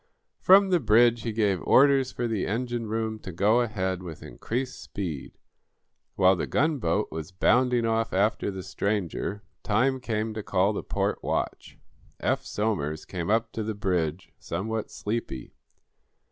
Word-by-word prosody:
From 195 Hz, +1 st, +6 dB
the 180 Hz, -, +4 dB
bridge 115 Hz, -1 st, +4 dB
he 115 Hz, -, -3 dB
gave 105 Hz, -4 st, +1 dB
orders 135 Hz, -1 st, +4 dB
for 120 Hz, -, -2 dB
the 110 Hz, -4 st, -1 dB
engine 120 Hz, +1 st, -2 dB
room 110 Hz, 0 st, -2 dB
to 95 Hz, -, -8 dB
go 105 Hz, +7 st, +3 dB
ahead 95 Hz, -5 st, -2 dB
with 85 Hz, -4 st, -8 dB
increased 125 Hz, +3 st, -4 dB
speed. 85 Hz, -9 st, -6 dB, 0.8 s
While 95 Hz, 0 st, +5 dB
the 85 Hz, -, -3 dB
gunboat 120 Hz, -, 0 dB
was 80 Hz, +3 st, -6 dB
bounding 125 Hz, +5 st, +3 dB
off 115 Hz, 0 st, 0 dB
after 100 Hz, +2 st, +1 dB
the 95 Hz, -2 st, -6 dB
stranger, 100 Hz, +1 st, -2 dB, 0.2 s
time 125 Hz, +5 st, +1 dB
came 110 Hz, -3 st, -2 dB
to 110 Hz, -, -4 dB
call 100 Hz, +1 st, +1 dB
the -, -, -3 dB
port -, -, -2 dB
watch. -, -, -3 dB, 0.4 s
Eph -, -, 0 dB
Somers 80 Hz, -8 st, -2 dB
came 90 Hz, -2 st, -4 dB
up 115 Hz, +1 st, +1 dB
to 110 Hz, -, -4 dB
the 110 Hz, 0 st, -3 dB
bridge, 90 Hz, -4 st, -1 dB
somewhat 110 Hz, +2 st, -3 dB
sleepy. 105 Hz, -, -4 dB
110 Hz, 150 wpm, -27 LUFS, 95-120 Hz, 0.8 s, From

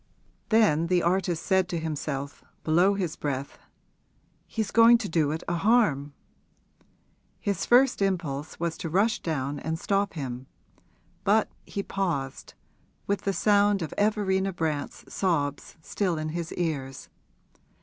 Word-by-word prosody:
Then 200 Hz, -8 st, +4 dB
the 180 Hz, 0 st, +2 dB
artist 175 Hz, -1 st, 0 dB
said 190 Hz, -2 st, +2 dB
to 175 Hz, -, -2 dB
himself, 145 Hz, -3 st, -4 dB, 0.2 s
below 175 Hz, +5 st, +3 dB
his 180 Hz, -5 st, -2 dB
breath, 140 Hz, -1 st, -4 dB, 0.9 s
'He's 220 Hz, -3 st, -3 dB
going 230 Hz, +1 st, +7 dB
to 230 Hz, -3 st, -4 dB
do 160 Hz, -4 st, +1 dB
it 160 Hz, +2 st, -3 dB
a 175 Hz, -, 0 dB
harm!' 165 Hz, -, +2 dB, 1.3 s
His 200 Hz, -3 st, -2 dB
first 250 Hz, -1 st, +4 dB
impulse 160 Hz, -7 st, -2 dB
was 170 Hz, -1 st, -2 dB
to 165 Hz, -, -4 dB
rush 200 Hz, +7 st, +2 dB
down 145 Hz, -3 st, -3 dB
and 160 Hz, +2 st, -3 dB
stop 200 Hz, +3 st, 0 dB
him; 130 Hz, -4 st, -5 dB, 0.8 s
but 215 Hz, +2 st, +3 dB, 0.2 s
he 200 Hz, -, -4 dB
paused, 165 Hz, -11 st, -3 dB, 0.5 s
with 200 Hz, 0 st, -1 dB
the 200 Hz, -, +2 dB
sound 205 Hz, -2 st, +3 dB
of 155 Hz, -, -5 dB
Everina 195 Hz, -2 st, +1 dB
Brant's 155 Hz, -4 st, -3 dB
sobs 150 Hz, -7 st, -2 dB
still 180 Hz, -2 st, -1 dB
in 155 Hz, 0 st, -3 dB
his 170 Hz, +1 st, -4 dB
ears. 140 Hz, -6 st, -3 dB
175 Hz, 135 wpm, -27 LUFS, 150-200 Hz, 1.3 s, going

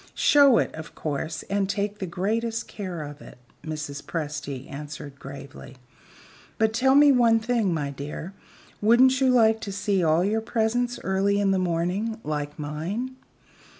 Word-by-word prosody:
"Show 280 Hz, -4 st, +6 dB
it, -, -, 0 dB
of 160 Hz, +1 st, -9 dB
course; 155 Hz, +1 st, -3 dB
and 195 Hz, -1 st, -1 dB
take 205 Hz, +1 st, -2 dB
the 190 Hz, -, -3 dB
greatest 220 Hz, +6 st, -2 dB
care 185 Hz, -6 st, -5 dB
of 145 Hz, 0 st, -9 dB
it," -, -, -13 dB, 0.3 s
Mrs. 150 Hz, -3 st, -5 dB
Presty 145 Hz, -4 st, -5 dB
answered 145 Hz, -1 st, -8 dB
gravely. 140 Hz, -1 st, -10 dB, 0.8 s
"But 220 Hz, 0 st, +2 dB
tell 265 Hz, +4 st, +3 dB
me 290 Hz, 0 st, +7 dB
one 235 Hz, -3 st, +4 dB
thing, 225 Hz, -4 st, 0 dB
my 145 Hz, -4 st, -2 dB
dear, 150 Hz, +6 st, -7 dB, 0.5 s
wouldn't 255 Hz, +4 st, +5 dB
you 265 Hz, -, +4 dB
like 225 Hz, -3 st, +4 dB
to 200 Hz, -, -5 dB
see 195 Hz, -1 st, 0 dB
all 160 Hz, +2 st, +3 dB
your 220 Hz, +2 st, 0 dB
presents 240 Hz, +2 st, 0 dB
early 195 Hz, +1 st, +1 dB
in 200 Hz, -1 st, +2 dB
the 190 Hz, -, +2 dB
morning, 185 Hz, +6 st, -1 dB
like 150 Hz, -1 st, -4 dB
mine?" 170 Hz, -, -4 dB
195 Hz, 155 wpm, -25 LUFS, 150-225 Hz, 0.8 s, me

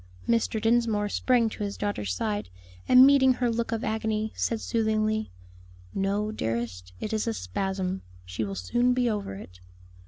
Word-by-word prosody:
Mr. 230 Hz, -1 st, +1 dB
Dinsmore 225 Hz, -2 st, +2 dB
sprang 245 Hz, +1 st, +2 dB
to 210 Hz, -, -6 dB
his 200 Hz, 0 st, -4 dB
daughter's 155 Hz, -, -2 dB
side, 105 Hz, +1 st, -2 dB, 0.4 s
and 255 Hz, +1 st, +9 dB
meeting 270 Hz, -2 st, +6 dB
her 245 Hz, -1 st, 0 dB
look 230 Hz, 0 st, -2 dB
of 225 Hz, 0 st, -2 dB
agony, 220 Hz, 0 st, -1 dB
said 230 Hz, -, -1 dB
soothingly, 215 Hz, -1 st, 0 dB, 0.6 s
"No, 200 Hz, +2 st, 0 dB
dearest, 110 Hz, -, -3 dB
it 215 Hz, -, -4 dB
is 220 Hz, +1 st, -1 dB
a 225 Hz, -, 0 dB
spasm, 190 Hz, -2 st, -3 dB, 0.2 s
she 90 Hz, +4 st, -3 dB
will 100 Hz, -2 st, -4 dB
soon 240 Hz, -, +1 dB
be 250 Hz, -1 st, +2 dB
over 205 Hz, -, -2 dB
it." 90 Hz, -2 st, -11 dB
215 Hz, 160 wpm, -27 LUFS, 180-230 Hz, 0.6 s, and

